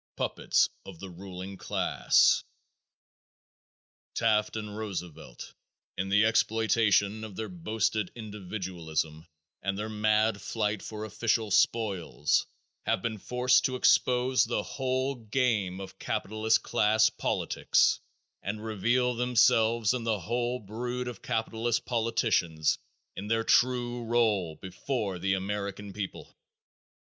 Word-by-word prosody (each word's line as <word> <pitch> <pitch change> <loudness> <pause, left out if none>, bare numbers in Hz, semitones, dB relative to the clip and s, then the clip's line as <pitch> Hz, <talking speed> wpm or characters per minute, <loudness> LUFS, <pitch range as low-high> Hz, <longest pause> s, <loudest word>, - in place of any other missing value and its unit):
Puppets - - +2 0.2
of 95 - -10
the 95 -1 -8
Ruling 95 +1 -8
Class. - - +3 1.7
Taft 110 -2 +2
and 105 -1 -5
Roosevelt 90 - -7 0.4
in 95 +1 -3
the 100 +2 +4
exploitation 110 -1 +2
of 105 -3 -8
their 110 +2 -4
boasted 105 +2 -1
individualism 90 -7 -4 0.3
and 100 0 -2
their 105 +1 -3
mad 110 0 +2
fight 105 -1 -1
for 110 0 -6
official 110 0 0
spoils 95 - +1 0.4
have - - +1
been 110 -2 -2
forced 125 +3 +2
to 130 -1 0
expose 125 0 +3
the 115 -2 -1
whole 130 +1 -1
game 110 -5 -1
of 95 -1 -9
capitalist 110 +2 0
class 110 +1 +3
politics - - +1 0.4
and 105 +2 -5
reveal 120 +4 +1
themselves 120 -2 +3
and 125 -2 -3
the 110 -4 0
whole 120 +6 -1
brood 120 +3 -4
of 120 -4 -7
capitalist 115 +1 -1
politicians 110 -9 +1 0.4
in 100 - -6
their 115 +1 +1
true 120 0 +2
role 110 -8 +1
before 95 - -4
the 95 +2 +1
American 100 +1 -4
people. 100 -1 -6
110 Hz, 115 wpm, -29 LUFS, 95-120 Hz, 1.7 s, the